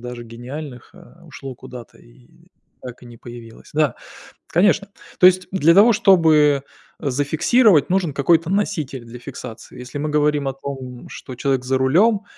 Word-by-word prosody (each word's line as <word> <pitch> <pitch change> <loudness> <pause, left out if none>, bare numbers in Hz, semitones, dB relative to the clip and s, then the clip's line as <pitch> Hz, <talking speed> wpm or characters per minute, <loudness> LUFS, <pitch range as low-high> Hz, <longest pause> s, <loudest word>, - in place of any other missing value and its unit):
даже 125 0 -8
гениальных, 125 +3 -9
а, - - -18
ушло 135 -1 -9
куда-то 125 -2 -12
и - - -21 0.5
так 125 -1 -10
и - - -13
не 120 -1 -14
появилось. 120 -1 -13
Да, 150 -5 +1 0.5
конечно. 200 +3 +1 0.3
То 180 - +7
есть 185 0 +3
для 170 -3 +3
того, 215 +5 +6
чтобы 160 - +4 0.4
зафиксировать, 150 - +2
нужен 180 -6 0
какой-то 160 +4 +2
носитель 160 -10 -2
для 120 +1 -11
фиксации. 120 -3 -10
Если 125 +3 -8
мы 150 +2 -3
говорим 150 -1 0
о 135 - -4
том, 130 -2 -8
что 130 - -9
человек 130 0 -1
за 130 +1 0
рулём, 195 - +2
140 Hz, 155 wpm, -20 LUFS, 125-170 Hz, 0.5 s, То